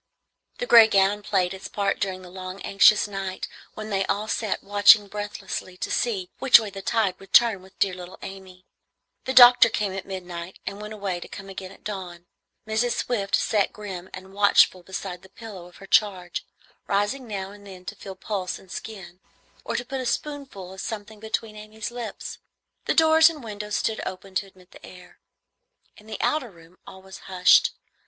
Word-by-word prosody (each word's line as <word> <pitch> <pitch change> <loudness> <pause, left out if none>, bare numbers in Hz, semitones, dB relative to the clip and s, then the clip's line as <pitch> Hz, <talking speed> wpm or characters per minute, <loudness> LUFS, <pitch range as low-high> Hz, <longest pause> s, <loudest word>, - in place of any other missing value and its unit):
The - - -3
gray 230 - +8
gown 200 0 +3
played 190 -3 0
its 190 - -8
part 200 -1 -1
during 185 -1 -3
the 180 - -12
long 185 +1 -7
anxious 205 +2 +5
night 195 -2 -5 0.3
when 215 0 -7
they 195 -1 +1
all 210 +2 -1
sat 220 -2 -2
watching 205 +1 +6
breathlessly 205 -2 -6
to - - -4
see 195 -7 -1
which 265 -3 +8
way 215 -3 -5
the 195 0 -7
tide 200 -3 0
would 195 - -16
turn 230 -5 +5
with 190 +1 -18
dear 195 -2 +1
little 180 0 -9
Amy. 190 -1 -10 0.6
The 260 - -1
doctor 245 -2 +9
came 205 -3 -2
at 190 -1 -6
midnight, 180 -2 -7
and 200 +1 -5
went 210 +1 -7
away 195 -4 -3
to - - -9
come 195 -1 -10
again 190 -1 -8
at - - -17
dawn. 180 -4 -7 0.4
Mrs. 220 +2 +1
Swift 205 -5 0
sat 210 -2 +1
grim 190 -3 -8
and 190 +1 -10
watchful 200 -2 +4
beside 180 0 -6
the 190 - -17
pillow 195 -4 -10
of 180 - -17
her 195 - -12
charge, 190 -4 +1 0.4
rising 205 +6 0
now 195 -2 -5
and 205 0 -14
then 185 -2 -12
to 205 - -5
feel 195 -1 -9
pulse 185 -1 -4
and 190 - -17
skin, 190 -5 -8 0.4
or - - -4
to 245 - -2
put 270 +1 -4
a - - -5
spoonful 265 -9 -4
of 190 - -7
something 215 -1 -6
between 220 0 -4
Amy's 215 +1 -7
lips. 235 -4 -7 0.5
The - - 0
doors 320 0 +6
and 305 -5 -9
windows 210 -1 -5
stood 220 -1 -1
open 190 +1 -7
to 195 +1 -1
admit 185 -1 -21
the - - -16
air. 180 -1 -14 0.8
In 215 - -18
the 220 - -5
outer 300 -6 0
room 170 -1 -19
all 190 0 -12
was 190 0 -11
hushed. 180 -1 +5
200 Hz, 190 wpm, -25 LUFS, 185-215 Hz, 0.8 s, doctor